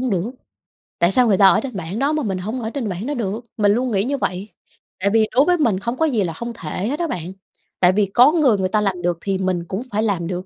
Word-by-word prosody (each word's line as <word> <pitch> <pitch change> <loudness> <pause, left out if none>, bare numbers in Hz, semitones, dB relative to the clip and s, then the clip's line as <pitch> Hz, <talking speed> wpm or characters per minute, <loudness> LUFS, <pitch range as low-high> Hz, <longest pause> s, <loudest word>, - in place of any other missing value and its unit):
hổng 255 -2 -1
được? 190 +4 -1 0.7
Tại 175 +2 +3
sao 250 +3 +3
người 200 -4 +3
ta 195 - +7
ở - - +5
trên 260 -5 -6
bảng 185 +4 -4
đó 280 +3 +1
mà 305 -2 -1
mình 190 -4 -2
hổng 220 +7 -4
ở 220 - -3
trên 235 -3 -4
bảng 185 +3 -4
đó 295 - -1
được? 225 -4 -3 0.2
Mình 205 -2 +3
luôn 245 +3 0
nghĩ 195 -2 +1
như 280 +5 -1
vậy. 195 -4 -3 0.5
Tại 200 +2 +1
vì 220 -1 +4
đối 275 +3 +5
với 355 0 +3
mình 230 - +1
không 235 +5 -4
có 320 - +2
gì 235 -10 +1
là 165 -2 -3
không 235 +7 -6
thể 185 +1 -4
hết 290 +5 -3
á 340 - 0
bạn. 180 - -5 0.5
Tại 180 -1 +5
vì 205 +2 +2
có 250 +5 +6
người 290 -10 +3
người 190 -1 -1
ta 215 +2 +1
làm 190 -3 -1
được 175 -1 0
thì 195 -1 -1
mình 185 -2 -1
cũng 190 +5 -4
phải 215 +1 0
làm 190 -6 -1
được, 180 +1 -4
210 Hz, 295 wpm, -20 LUFS, 185-245 Hz, 0.7 s, ta